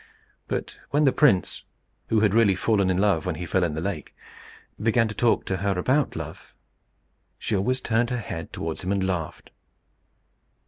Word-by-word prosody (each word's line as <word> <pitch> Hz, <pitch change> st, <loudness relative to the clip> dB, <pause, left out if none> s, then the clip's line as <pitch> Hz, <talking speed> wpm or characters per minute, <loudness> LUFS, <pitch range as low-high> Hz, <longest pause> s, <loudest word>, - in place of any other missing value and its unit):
But -, -, -4 dB
when 150 Hz, +1 st, +2 dB
the 135 Hz, -, +5 dB
prince, 125 Hz, -13 st, +2 dB, 0.4 s
who 110 Hz, -1 st, +2 dB
had 105 Hz, -2 st, +3 dB
really 110 Hz, -4 st, +4 dB
fallen 100 Hz, -1 st, +1 dB
in 90 Hz, -, +1 dB
love 95 Hz, -5 st, +2 dB
when 90 Hz, -3 st, -2 dB
he 85 Hz, +2 st, -5 dB
fell 95 Hz, +2 st, +1 dB
in 80 Hz, -3 st, -1 dB
the 80 Hz, -, -3 dB
lake, 95 Hz, -4 st, -4 dB, 0.7 s
began 115 Hz, +1 st, +3 dB
to 110 Hz, -, -5 dB
talk 120 Hz, +1 st, +2 dB
to 95 Hz, -, -1 dB
her 100 Hz, -1 st, -1 dB
about 130 Hz, +11 st, +1 dB
love, -, -, -8 dB, 0.8 s
she -, -, -2 dB
always 125 Hz, +7 st, 0 dB
turned 120 Hz, +1 st, +1 dB
her 125 Hz, -, -1 dB
head 85 Hz, -8 st, -6 dB
towards 80 Hz, +2 st, -5 dB
him 90 Hz, -, -2 dB
and 100 Hz, -1 st, +1 dB
laughed. 90 Hz, -4 st, -4 dB
100 Hz, 180 wpm, -25 LUFS, 90-115 Hz, 0.8 s, the